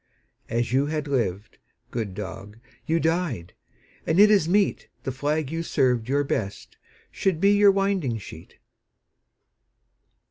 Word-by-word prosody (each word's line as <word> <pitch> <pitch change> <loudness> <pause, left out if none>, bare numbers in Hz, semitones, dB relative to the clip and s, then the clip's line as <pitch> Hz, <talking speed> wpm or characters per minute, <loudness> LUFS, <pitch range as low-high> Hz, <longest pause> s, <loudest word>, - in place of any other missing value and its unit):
As 120 0 -1
you 135 +2 +2
had 150 -1 -3
lived, 115 -6 -2 0.3
good 110 -6 -4
dog, 105 +1 -7 0.3
you 165 +1 +2
died, 160 - -1 0.5
And 160 +3 +2
it 210 +1 +8
is 195 -6 +3
meet 200 +2 +1 0.2
The 130 - -2
flag 145 +2 -2
you 165 0 -2
served 125 -7 +1
your 145 +1 +2
best 100 -7 -4 0.4
should 185 -5 0
be 200 +3 +4
Your 205 0 +6
winding 195 - +1
sheet. 80 -6 -11
140 Hz, 135 wpm, -25 LUFS, 115-170 Hz, 0.5 s, it